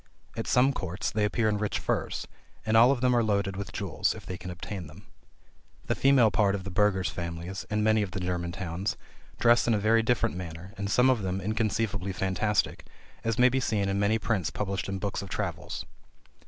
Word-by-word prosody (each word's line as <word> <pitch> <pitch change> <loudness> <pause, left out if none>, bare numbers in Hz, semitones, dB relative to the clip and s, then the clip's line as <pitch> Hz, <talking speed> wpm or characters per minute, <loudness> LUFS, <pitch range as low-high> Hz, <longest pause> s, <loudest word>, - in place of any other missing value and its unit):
At - - -4
some 130 +2 +4
courts, 95 -1 -3
they 105 0 0
appear 110 +2 +1
in 105 -1 +1
rich 105 -2 -1
furs: - - -2 0.4
and 110 0 +1
all 120 +3 +7
of 130 -3 -1
them 125 -1 +3
are 120 - +3
loaded 100 -2 0
with 100 -1 -5
jewels, - - -1
if - - -11
they 90 - -5
can 90 0 -8
obtain 90 0 -6
them. 85 +8 -14 0.8
The - - +1
female 135 -5 +4
part 100 0 +2
of 95 - -5
the 100 - -6
burgher's 95 -1 +2
families, 85 +2 -5
in 105 0 0
many 110 0 +4
of 100 - -2
the 95 - -5
German 90 -1 -2
towns, 95 +1 -3 0.4
dress 120 0 +4
in 115 - +4
a - - +2
very 110 +2 +3
different 115 -3 +1
manner, 90 +1 -7
and 100 -2 -3
some 125 +5 +5
of 120 -4 0
them 95 0 -2
inconceivably 105 -2 -1
fantastic, 95 +3 0 0.4
as 115 -1 0
may 125 +1 +6
be 130 +2 0
seen 105 -5 0
in 100 0 0
many 100 +2 +3
prints 105 -6 -1
published 100 -1 -3
in 95 - -2
books 100 +1 -3
of 100 - -8
travels. - - -4
100 Hz, 210 wpm, -28 LUFS, 95-110 Hz, 0.8 s, all